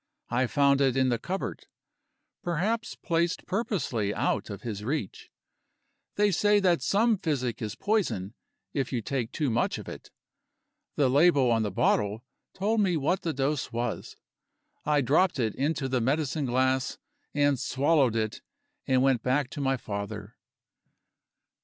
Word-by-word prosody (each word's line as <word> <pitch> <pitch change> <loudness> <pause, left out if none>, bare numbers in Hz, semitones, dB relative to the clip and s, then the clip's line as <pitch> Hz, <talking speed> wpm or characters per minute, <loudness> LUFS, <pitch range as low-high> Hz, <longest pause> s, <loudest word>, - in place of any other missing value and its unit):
I 125 +1 +2
found 140 +1 +3
it 135 -1 +2
in 130 -1 +3
the 120 -2 0
cupboard 190 +9 -4 0.7
perhaps 200 +7 -1
placed 170 0 -1
purposely 175 - -1
out - - -1
of 100 - -7
his 105 -4 -5
reach. 125 -4 -4 0.9
They 205 0 +3
say 205 +3 +3
that 180 -4 +2
some 220 +1 +2
physic 130 -9 -2
is 105 -2 -4
poison, 190 - -1 0.4
if 135 -3 -1
you 120 -4 -2
take 125 -2 -2
too 145 -6 -1
much 115 - 0
of - - -9
it. - - -9 0.9
The 140 - +3
label 140 -2 +4
on 115 -1 +2
the 105 - 0
bottle 105 +3 +1 0.3
told 210 +3 +1
me 180 -4 +2
what 165 +6 0
the 165 - -1
dose 140 0 -1
was. 120 0 -3 0.7
I 150 -1 +3
dropped 155 +8 +2
it 115 -4 0
into 140 0 -1
the 130 -2 0
medicine 145 +3 0
glass, 130 +1 +1 0.4
and 145 -2 +3
swallowed 135 -2 +2
it, 110 -1 -2 0.5
and 130 -1 +3
went 135 -4 +3
back 130 +2 0
to 145 - -5
my 135 -1 +1
father. 105 -1 -6
135 Hz, 150 wpm, -28 LUFS, 120-165 Hz, 0.9 s, label